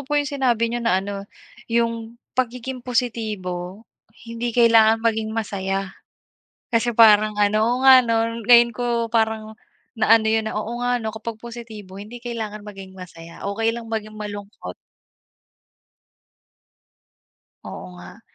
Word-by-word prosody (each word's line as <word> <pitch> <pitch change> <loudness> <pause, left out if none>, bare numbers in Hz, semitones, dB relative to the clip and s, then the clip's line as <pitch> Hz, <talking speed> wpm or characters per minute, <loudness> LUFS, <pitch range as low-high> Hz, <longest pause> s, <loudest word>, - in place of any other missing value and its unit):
po 295 - +1
yung 290 - +2
sinabi 245 -5 +1
niyo 240 - -2
na 230 -5 +2
ano, 200 +1 -3 0.5
"Yung 230 0 -1 0.2
pagiging 250 +1 -3
positibo, 215 -6 -3 0.4
hindi 230 +1 -4
kailangan 225 -1 +4
maging 220 -1 +1
masaya." 195 -3 -3 0.8
Kasi 230 +1 +1
parang 215 -2 +6
ano 205 +1 +3
oo 240 +2 +1
nga 260 -1 +9 0.4
ngayon 235 +1 +6
ko 235 -1 -1
parang 220 -1 0 0.4
na 220 +1 +6
ano 220 - -3
yun 220 0 +2
na, - - -6
Oo 235 +3 -4
nga 245 0 +1
no, 220 - -2
kapag 220 0 -6
positibo 225 -5 -10
hindi 225 +4 -9
kailangan 220 -3 -6
maging 195 -2 -10
masaya, 170 -2 -11
okey 225 +3 0
lang 235 -1 -7
maging 215 -1 -5
malungkot. 205 - -8 2.9
Oo - - -8
nga. 90 0 -13
225 Hz, 130 wpm, -22 LUFS, 210-235 Hz, 2.9 s, nga